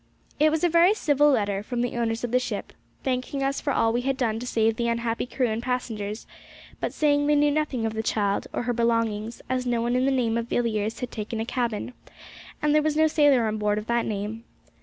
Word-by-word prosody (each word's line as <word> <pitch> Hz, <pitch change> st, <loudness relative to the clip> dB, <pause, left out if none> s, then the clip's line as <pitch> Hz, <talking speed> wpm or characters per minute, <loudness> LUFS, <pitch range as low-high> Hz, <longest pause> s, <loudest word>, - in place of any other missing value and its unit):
It 305 Hz, +1 st, +5 dB
was 315 Hz, +1 st, -1 dB
a -, -, +6 dB
very 345 Hz, +4 st, +5 dB
civil 295 Hz, -6 st, +3 dB
letter 205 Hz, -7 st, +1 dB
from 240 Hz, +3 st, -3 dB
the 245 Hz, 0 st, -2 dB
owners 230 Hz, -1 st, -1 dB
of 240 Hz, -, -2 dB
the 250 Hz, -, +4 dB
ship, 250 Hz, -, -5 dB, 0.3 s
thanking 260 Hz, +1 st, -2 dB
us 275 Hz, 0 st, -1 dB
for 285 Hz, -, -1 dB
all 225 Hz, -3 st, +2 dB
we 240 Hz, -, +1 dB
had 270 Hz, +1 st, -1 dB
done 225 Hz, -4 st, 0 dB
to 245 Hz, -, -6 dB
save 225 Hz, -2 st, +2 dB
the 235 Hz, +1 st, -1 dB
unhappy 235 Hz, 0 st, -1 dB
crew 255 Hz, 0 st, 0 dB
and 220 Hz, +1 st, -2 dB
passengers, 225 Hz, -4 st, -3 dB, 0.5 s
but -, -, -2 dB
saying 290 Hz, -1 st, +2 dB
they 295 Hz, -, +4 dB
knew 295 Hz, 0 st, +4 dB
nothing 285 Hz, -6 st, -1 dB
of 220 Hz, -, -1 dB
the 220 Hz, -, -2 dB
child 205 Hz, -2 st, 0 dB
or -, -, -2 dB
her 245 Hz, 0 st, -1 dB
belongings, 230 Hz, -1 st, -1 dB
as 255 Hz, -1 st, -1 dB
no 240 Hz, -1 st, +1 dB
one 240 Hz, +1 st, 0 dB
of 255 Hz, -, +2 dB
the -, -, +3 dB
name 235 Hz, -4 st, +1 dB
of 230 Hz, -, -4 dB
Villiers 220 Hz, -3 st, -1 dB
had 250 Hz, -, -4 dB
taken 220 Hz, 0 st, -4 dB
a 225 Hz, -, -1 dB
cabin, 240 Hz, -1 st, -2 dB, 0.7 s
and 300 Hz, -1 st, +3 dB
there 305 Hz, -, +5 dB
was 305 Hz, 0 st, 0 dB
no 315 Hz, -, +5 dB
sailor 290 Hz, -6 st, +4 dB
on 215 Hz, 0 st, -2 dB
board 210 Hz, 0 st, +1 dB
of 210 Hz, -, -4 dB
that 235 Hz, 0 st, 0 dB
name. 215 Hz, +2 st, -4 dB
240 Hz, 240 wpm, -25 LUFS, 225-275 Hz, 0.7 s, a